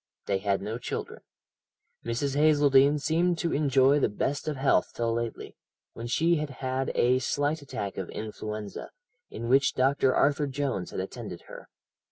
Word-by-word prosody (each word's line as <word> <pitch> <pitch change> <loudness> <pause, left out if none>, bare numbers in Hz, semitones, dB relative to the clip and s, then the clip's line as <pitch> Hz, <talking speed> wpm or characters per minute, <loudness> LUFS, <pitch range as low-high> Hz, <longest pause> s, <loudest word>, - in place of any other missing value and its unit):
They 100 -1 0
had 100 0 -1
no 110 +3 -4
children. - - -5 0.8
Mrs. 135 +4 -2
Hazeldene 145 -1 +5
seemed 165 +4 +1
to 170 0 -1
enjoy 140 -1 +4
the - - +2
best 140 +9 -2
of 155 - -1
health 135 +1 +2
till 115 -1 0
lately, 115 -1 -4 0.4
when 115 +1 -6
she 165 +7 +2
had 150 -1 -3
had 130 0 -3
a 125 +1 +3
slight 145 +4 -1
attack 100 -8 -5
of 95 - -5
influenza, 105 -1 -6 0.4
in 115 +1 -6
which 135 +3 +3
Dr. 135 0 +2
Arthur 145 +1 +2
Jones 135 -9 -2
had - - -4
attended 95 -2 -7
her. - - -12
135 Hz, 160 wpm, -28 LUFS, 115-145 Hz, 0.8 s, Hazeldene